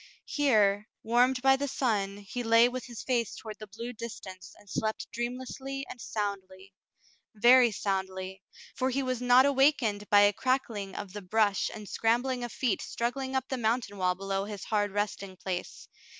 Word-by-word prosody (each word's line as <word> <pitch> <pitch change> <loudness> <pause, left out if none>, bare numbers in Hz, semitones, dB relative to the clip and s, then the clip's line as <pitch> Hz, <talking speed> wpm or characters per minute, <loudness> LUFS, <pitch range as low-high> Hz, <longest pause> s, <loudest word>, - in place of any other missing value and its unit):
Here, 215 -8 +2 0.2
warmed 250 +3 +3
by 270 0 +6
the 285 +1 -2
sun, 205 -7 -1
he 205 +4 -6
lay 230 0 +5
with 250 +1 -5
his 240 -3 -8
face 240 -4 0
toward 215 -2 -9
the 215 - -8
blue 230 +4 -7
distance 210 -5 -8
and 205 - -20
slept 220 +2 -2
dreamlessly 260 +3 -4
and 245 - -9
soundly, 195 -3 -5 0.3
— - - -28 0.3
very 240 +3 +7
soundly, 190 -2 -3 0.3
for 260 0 0
he 270 +1 -1
was 255 -2 -2
not 250 +1 +6
awakened 270 -7 +2
by 205 0 +7
a 205 0 +5
crackling 230 -6 -1
of 200 -3 -6
the 205 - -6
brush 205 +1 +1
and 210 -2 -9
scrambling 245 +5 0
of 240 - -4
feet 245 -7 0
struggling 260 +3 -3
up 265 0 0
the 260 - -1
mountain 220 -3 -1
wall 180 -1 +2
below 195 +1 -2
his 205 -2 -7
hard 205 -1 0
resting 200 -2 -3
place. 180 -1 -5
225 Hz, 175 wpm, -29 LUFS, 200-255 Hz, 0.3 s, very